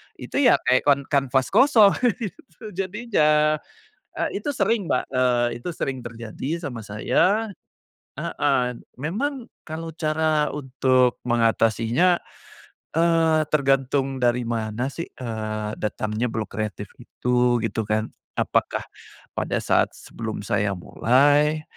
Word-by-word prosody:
itu - - -4
ya - - +7
kayak 130 +3 +2
kan 140 -1 +5
kanvas 135 -2 +1
kosong 220 -3 +6 0.3
gitu 205 +2 -9
jadinya. 170 -7 +1 0.6
Eee, - - -2
itu 285 +7 -3
sering 225 -7 +1
Mbak, 125 - 0
eee, 125 -2 +2
itu 175 - -5
sering 135 -1 -2
terjadi 115 +3 -6
sama 130 -7 -5
saya 200 - +1 0.7
heeh. 125 -4 0 0.2
Memang 230 - -3 0.2
kalau 165 +1 -5
cara 155 -1 +1
untuk 130 -3 +2
mengatasinya, 115 - +2 0.8
eee, 165 -2 +3
tergantung 135 -1 +1
dari 120 0 +2
mana 115 +2 -2
sih, 170 +4 -5
eee, 110 -3 -5
datangnya 110 +2 -2
blok 110 -1 -3
kreatif 105 -1 -4
itu 125 0 +1
gitu 115 -1 -2
kan. 110 +1 0 0.3
Apakah - - 0 0.5
pada - - -1
saat - - +2
sebelum 110 -2 -6
saya 100 0 0
mulai, 145 - +2
135 Hz, 115 wpm, -23 LUFS, 115-160 Hz, 0.8 s, ya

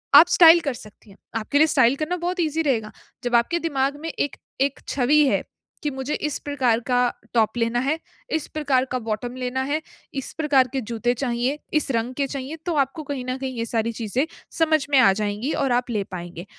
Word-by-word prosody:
आप 315 +4 +10
स्टाइल 340 -1 +8
कर 285 -5 -2
सकती 215 -2 -14
हैं, 195 - -16 0.2
आपके 225 +6 0
लिए 310 +2 +6
स्टाइल 260 -4 +4
करना 310 +5 -2
बहुत 355 +1 -3
ईज़ी 320 0 0
रहेगा। 230 -7 0 0.3
जब 245 0 +1
आपके 235 +9 +3
दिमाग 285 -4 0
में 330 - -4
एक 285 -3 -2 0.3
एक 275 0 +1
छवि 285 +3 +4
है, - - +1 0.4
कि 300 - +1
मुझे 265 +2 -4
इस 300 -1 -2
प्रकार 260 -6 +1
का 250 -1 +2 0.4
टॉप 220 0 +2
लेना 230 +1 +1
है, 275 +5 0 0.4
इस 315 - -2
प्रकार 280 -4 +1
का 255 - 0
बॉटम 230 +2 -4
लेना 255 0 -2
है, 290 +4 -1 0.3
इस 270 -2 -4
प्रकार 280 -4 +4
के 265 - -1
जूते 235 +1 -1
चाहिए, 250 +2 -1 0.2
इस 305 -3 +1
रंग 235 +1 -1
के 280 0 0
चाहिए 275 +2 -5
तो 350 - 0
आपको 275 +4 -8
कहीं 280 -3 -4
न 255 0 -2
कहीं 265 -1 -4
ये 230 - -1
सारी 230 0 -1
चीज़ें 230 +5 -1 0.3
समझ 315 -2 +3
में 280 - +5
आ 230 -7 +6
जाएँगी 210 +6 -2
और 270 - +1
आप 245 +1 0
ले 210 -3 0
पाएँगे। 175 -1 -7
260 Hz, 215 wpm, -23 LUFS, 235-295 Hz, 0.4 s, आप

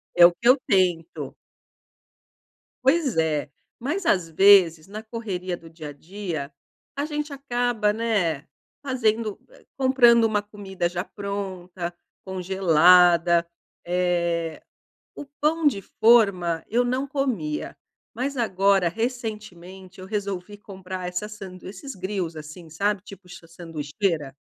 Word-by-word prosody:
É 175 - +9
o 175 - +6
que 235 +7 -2
eu 265 - +7
tento. 175 -4 0 1.5
Pois 270 - +2
é, 155 -3 0 0.3
mas 335 +9 -3
às 180 - +2
vezes, 175 -2 +5
na 215 +2 -8
correria 195 -6 -4
do 165 -1 -14
dia 160 -2 -9
a - - -7
dia, 160 -2 -6 0.4
a 285 +1 -1
gente 295 -1 -4
acaba, 245 -5 0
né, 200 -10 0 0.4
fazendo 225 -5 0
eh, - - -20
comprando 255 -3 +5
uma 215 -2 +1
comida 195 -3 -4
já 175 +1 -3
pronta, 190 -4 -5 0.3
congelada. 175 -2 +4 0.4
Eh, 170 -2 -1 0.5
o - - -7 0.2
pão 310 +1 +1
de 205 -9 +2
forma 195 -8 +3
eu 245 +2 +2
não 255 +3 -1
comia, 250 - -2 0.4
mas 270 +4 -3
agora, 195 -5 +2
recentemente, 200 -4 -6
eu 185 - -9
resolvi 200 -1 -4
comprar 190 -3 -7
essa 180 +4 -4
sandui 190 -4 -10
esses 235 +7 -9
grills, 185 -3 -4
assim, 155 +2 -10
sabe? 200 +4 -1
Tipo 195 -2 -13
sanduicheira. 165 -2 -4
190 Hz, 125 wpm, -24 LUFS, 175-225 Hz, 1.5 s, É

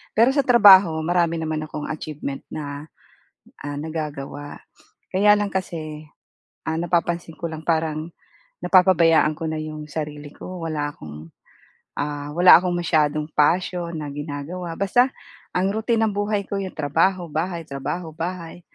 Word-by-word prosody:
Pero 235 +4 +5
sa 280 - 0
trabaho 195 -8 +7
marami 170 0 +1
naman 155 -1 -2
akong 150 -1 -6
achievement 150 -3 -5
na, 145 0 -6 0.8
ah, 145 0 -4
nagagawa. 145 -2 -6 0.5
Kaya 205 +2 +6
lang 205 -1 0
kasi, 155 -5 -4 0.6
ah, 160 - 0
napapansin 170 -1 -1
ko 170 - -2
lang 160 0 -7
parang 160 0 -1 0.5
napapabayaan 170 -4 +4
ko 165 - -4
na 160 - -3
yung 155 -1 -6
sarili 150 -1 -5
ko, 180 +1 -8
wala 150 -2 -2
akong, 75 +1 -10 0.7
ah, 145 0 -3
wala 180 +1 +9
akong 180 -1 -1
masyadong 155 -3 +1
passion 170 +2 +1
na 150 -2 -5
ginagawa, 150 +4 -6
basta 245 +6 +3 0.5
ang 190 +2 +1
routine 225 +1 +1
ng 215 - -1
buhay 205 0 -1
ko 200 - -3
yung 190 -1 -5
trabaho, 165 +5 +1
bahay, 165 +2 -2
trabaho, 160 +4 -5
bahay. 170 +1 -5
165 Hz, 140 wpm, -23 LUFS, 150-180 Hz, 0.8 s, wala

